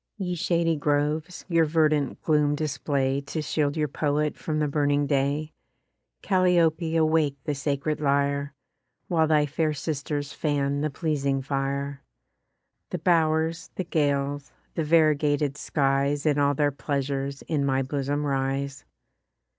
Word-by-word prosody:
Ye 185 -3 -2
shady 165 -1 +1
groves, 150 +4 -1
your 165 -3 +3
verdant 155 -3 +1
gloom 150 -2 +2
display 140 -2 -1
To 160 - -3
shield 150 0 -1
your 150 -1 +1
poet 150 +1 0
from 155 -1 -3
the 150 -1 +1
burning 145 0 +1
day; 140 +2 0 0.7
Calliope 175 -4 +2
awake 155 -3 +2
the 150 - -1
sacred 145 +2 -2
lyre, 140 0 0 0.5
While 160 -2 +3
thy 150 -1 +3
fair 155 +2 0
sisters 145 -1 -3
fan 145 -2 0
the 155 - 0
pleasing 140 -3 -1
fire: 140 0 -2 0.9
The - - -3
bow'rs, 160 -1 +1
the 185 - -2
gales, 145 -3 -1 0.2
the 165 - -1
variegated 150 -2 +2
skies 140 0 0
In 145 -2 +2
all 145 0 +3
their 145 +1 +2
pleasures 140 -1 -3
in 150 -4 -1
my 135 -1 +1
bosom 145 +2 -2
rise. 135 0 -2
145 Hz, 130 wpm, -26 LUFS, 140-155 Hz, 0.9 s, your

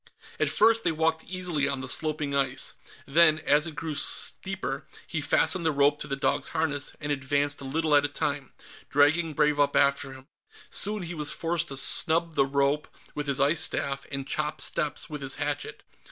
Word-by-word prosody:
At - - +1
first, 225 +1 +3
they - - +2
walked 160 0 0
easily 180 -6 -1
on 135 -2 -3
the 135 - -6
sloping 150 0 0
ice. 135 -2 -1 0.3
Then, 155 +2 +4
as 150 +1 +2
it 160 - -8
grew 155 +2 -4
steeper, 190 +5 -1 0.2
he - - -3
fastened 185 -2 +1
the 160 - +2
rope 145 0 +2
to - - -5
the 140 - -2
dog's 140 0 -1
harness 160 -3 -2
and 145 0 -4
advanced 145 +1 -1
a - - -7
little 155 +3 -1
at 145 - +5
a - - +1
time, 145 -1 -3 0.4
dragging 155 +3 +3
Brave 150 0 +2
up 145 0 +2
after 140 0 +2
him. 130 0 -13 0.5
Soon 210 -1 +2
he 175 0 -5
was 150 -3 -2
forced 165 0 -1
to 135 - -4
snub 165 +4 +3
the 135 -3 +2
rope 140 +2 0 0.3
with 150 0 -4
his 140 0 0
ice 145 +4 +3
staff 140 -3 -1
and 135 -1 -5
chop 150 +1 -2
steps 150 - -2
with 150 -2 -7
his 135 0 -1
hatchet. 145 0 -4
145 Hz, 195 wpm, -27 LUFS, 140-160 Hz, 0.5 s, at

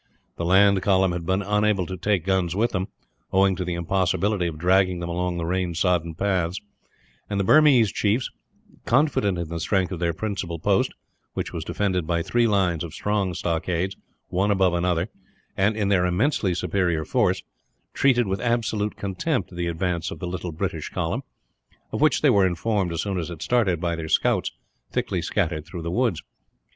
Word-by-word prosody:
The 85 - -3
land 95 +2 +5
column 95 -2 +3
had 85 -1 -4
been 95 +2 +1
unable 105 -1 +1
to 95 - -5
take 95 -1 0
guns 95 -3 +1
with 115 +4 +1
them, 95 -2 -2 0.4
owing 95 0 +3
to 90 - -3
the 90 -1 -3
impossibility 95 +2 0
of 80 -2 -5
dragging 90 +1 +2
them 85 0 -4
along 90 0 -1
the 85 - -2
rain 90 0 -1
sodden 85 -2 +1
paths; 95 -1 0 0.7
and 100 -1 -1
the - - +2
Burmese 135 -3 +5
chiefs, 110 +4 0 0.6
confident 120 - +2
in 85 -2 -4
the 85 0 -4
strength 95 +2 0
of 90 - -4
their 85 -1 +1
principal 95 -2 -4
post - - +1 0.4
which - - -3
was - - -4
defended 95 -5 -1
by 85 -1 0
three 120 +4 +2
lines 95 -6 +1
of 85 0 -7
strong 100 -4 -1
stockades, 85 +2 -1 0.3
one 95 +3 +1
above 95 -3 +3
another 85 0 0 0.5
and 105 +3 +1
in 100 -2 0
their 90 -2 +3
immensely 95 - +1
superior 85 -2 0
force, - - +1 0.5
treated 125 -3 +3
with 95 0 -2
absolute 115 -3 0
contempt 100 - -2
the 85 0 -2
advance 85 0 -1
of - - -7
the 90 - -5
little 90 0 -4
British 80 - -3
column - - -2 0.7
of - - -3
which - - +3
they - - +6
were 100 -2 +4
informed, 95 +1 -1
as 85 0 -2
soon 100 -3 -2
as 85 - -4
it 85 -2 -6
started, 110 -9 +2
by 85 0 -1
their 80 -1 -5
scouts - - +2 0.4
thickly - - -1
scattered 80 -2 -1
through 85 +1 -8
the 85 - -3
woods. 115 -5 0
95 Hz, 185 wpm, -24 LUFS, 85-100 Hz, 0.7 s, they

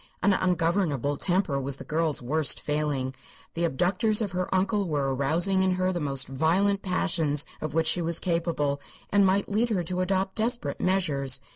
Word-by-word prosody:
An 200 - +4
ungovernable 165 -6 0
temper 175 -5 0
was 135 0 -2
the - - -8
girl's 155 -4 0
worst 150 +4 +2
failing; 150 -3 -2 0.4
the 170 +1 0
abductors 185 - +1
of 210 -4 -2
her 180 0 -2
uncle 195 +1 +1
were 140 -3 0
arousing 170 +8 +1
in 190 -1 +2
her 185 0 0
the 175 - -2
most 135 -3 0
violent 180 +9 +1
passions 165 -6 +1 0.2
of 155 -1 -4
which 165 0 +2
she 175 +2 +2
was 165 0 +1
capable, 165 -5 -1 0.3
and 200 -1 +4
might 195 +2 +1
lead 220 +4 0
her 190 -6 0
to 180 +2 -2
adopt 190 +1 0
desperate 235 +2 -1
measures. 145 -8 +1
170 Hz, 175 wpm, -26 LUFS, 145-190 Hz, 0.4 s, An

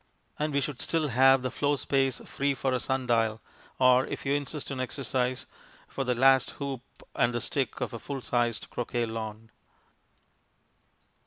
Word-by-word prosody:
And 150 +1 0
we 140 0 +1
should 135 -1 -3
still 160 -3 +1
have 135 +1 +5
the 130 - -1
floor 145 0 +1
space 135 -1 +1
free 140 0 -1
for 135 0 -1
a 125 - +1
sundial, 120 -5 +1 0.4
or 130 0 +5
if - - -5
you 135 - +2
insist 145 0 -3
on 135 - -4
exercise 130 -1 -1 0.4
for 135 - -3
the 125 -1 0
last 135 +1 +5
hoop 140 -3 -4 0.3
and 120 0 +1
the - - +1
stick 130 +1 -2
of - - -2
a 115 - -5
full 140 +1 -5
sized 120 -2 -1
croquet 120 0 -1
lawn. 110 0 -6
130 Hz, 165 wpm, -28 LUFS, 120-140 Hz, 0.4 s, have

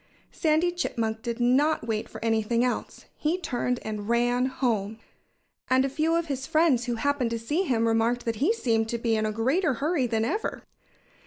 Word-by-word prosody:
Sandy 320 +2 +2
Chipmunk 225 -10 -2
did 235 0 -4
not 260 +4 +2
wait 220 -2 -2
for - - -7
anything 225 +1 +1
else. 250 - -4
He 315 +4 0
turned 250 -7 -2
and 215 -1 -5
ran 245 +2 +2
home. 225 -5 -1 0.7
And 260 +1 +4
a - - -1
few 320 +4 +1
of 335 0 +1
his 270 -3 -4
friends 310 -7 +3
who 240 -2 -1
happened 275 0 0
to 230 - -2
see 295 +12 -1
him 230 -6 +1
remarked 230 +2 +1
that 230 -2 -1
he 300 - +2
seemed 225 - 0
to 235 - -1
be 230 -1 0
in 215 0 0
a - - -1
greater 265 - +1
hurry 285 0 0
than 225 -1 0
ever. 420 - -3
245 Hz, 190 wpm, -26 LUFS, 225-295 Hz, 0.7 s, And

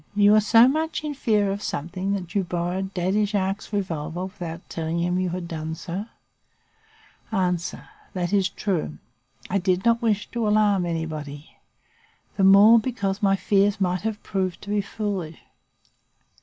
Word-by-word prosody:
You 205 0 +5
were 215 0 +6
so 225 +3 +6
much 315 +3 -1
in 300 -1 -3
fear 210 -7 +1
of 200 +1 -4
something 185 +4 -3
that 180 -3 -5
you 200 - +1
borrowed 180 +2 -3
Daddy 190 +4 +1
Jacques's 200 0 -2
revolver 175 -4 -3
without 175 -4 -7
telling 165 0 -3
him 180 +1 0
you 185 -1 0
had 175 0 -4
done 160 -1 -4
so? 185 +6 -5 1.2
"A. 180 -4 +1 0.6
That 180 +1 -2
is 195 -2 +3
true. 165 - -2 0.5
I 195 - 0
did 185 +1 0
not 235 0 +3
wish 215 -3 +1
to 235 -2 -1
alarm 205 -4 +3
anybody, 155 -3 -5 0.8
the 195 - +1
more, 200 +4 +8
because 210 -4 -2
my 195 -1 +3
fears 200 +1 +2
might 180 -1 0
have 220 -1 -4
proved 190 -3 -2
to 205 - -6
have 205 0 +2
been - - -14
foolish. 195 -7 -4
195 Hz, 160 wpm, -24 LUFS, 175-210 Hz, 1.2 s, more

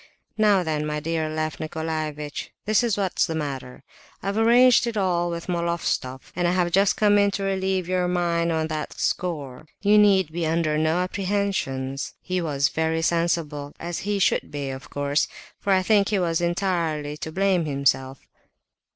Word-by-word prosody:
Now 210 -4 +4
then, 155 -2 -1
my 150 0 -2
dear 160 0 -2
Lef 155 0 -3
Nicolaievitch, 155 -2 -4 0.2
this 215 +2 +3
is 230 -4 +1
what's 190 -3 +1
the 165 - -3
matter. 135 -5 -5 0.4
I've 195 +1 -2
arranged 240 +2 +5
it 230 -2 -3
all 175 -3 +1
with 170 -1 -5
Moloftsoff, 170 -7 -2
and 175 0 +1
have 175 0 +1
just 195 +2 +3
come 205 -1 +4
in 200 0 +4
to 200 0 -3
relieve 190 -2 -1
your 180 -1 +1
mind 170 -1 0
on 160 -1 0
that 155 -1 -4
score. 155 -5 -2 0.2
You 210 +1 +6
need 190 -5 +4
be 170 +1 -3
under 160 -1 +1
no 155 +2 +1
apprehensions. 185 -8 -2
He 185 0 -2
was 140 -4 +1
very 160 0 -1
sensible, 165 -4 -1
as 170 0 -4
he 205 +1 -1
should 195 - +1
be, 140 -2 -4
of 130 0 -9
course, 145 +1 0 0.3
for 200 - -1
I 190 -1 +4
think 200 0 +3
he 205 - +1
was 170 -2 0
entirely 170 -4 -1
to 160 - -6
blame 190 -1 +1
himself." 135 -2 0
170 Hz, 170 wpm, -24 LUFS, 155-190 Hz, 0.4 s, You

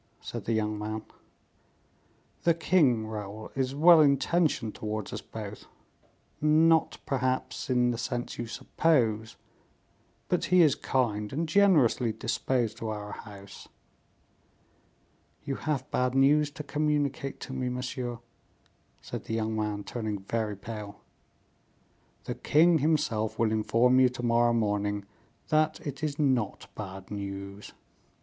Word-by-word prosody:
said - - -7
the 115 - 0
young 105 -1 -1
man. 110 +1 -4 1.4
"The 170 -1 +3
king, 145 -10 +3
Raoul, 110 0 -7
is 135 0 -1
well 165 +2 +7
intentioned 140 -4 +2
towards 110 -1 -4
us - - -4
both; - - -8 0.8
not, 160 +1 +4
perhaps, 130 0 -2
in 125 -1 +3
the 115 - -4
sense 120 +1 -3
you 120 - -3
suppose, 115 -5 0 0.9
but 180 - 0
he 180 -1 +5
is 150 -4 +5
kind, 105 -7 -1
and 160 +4 -2
generously 155 - +4
disposed 115 +1 -1
to 110 - -4
our 105 -1 -5
house." 100 -2 -11 1.8
"You 140 - -3
have 140 -2 -3
bad 125 0 0
news 145 +2 +4
to 150 +1 -8
communicate 145 -2 -1
to 130 - -6
me, 130 -1 -2
monsieur," 125 -1 -4 0.8
said - - -7
the 110 - -3
young 110 0 -1
man, 105 -1 -2
turning 110 -4 -4
very 110 0 -2
pale. 105 0 -8 1.2
"The - - -4
king 165 +2 +4
himself 140 -8 0
will 115 -2 +2
inform 115 +4 +3
you 130 -1 +6
to 125 0 -7
morrow 120 0 +3
morning 105 -2 0 0.4
that 155 0 +2
it 145 +1 -6
is 145 -2 -1
not 130 -8 0
bad 95 -2 -8
news." 100 0 -6
120 Hz, 130 wpm, -28 LUFS, 110-145 Hz, 1.8 s, well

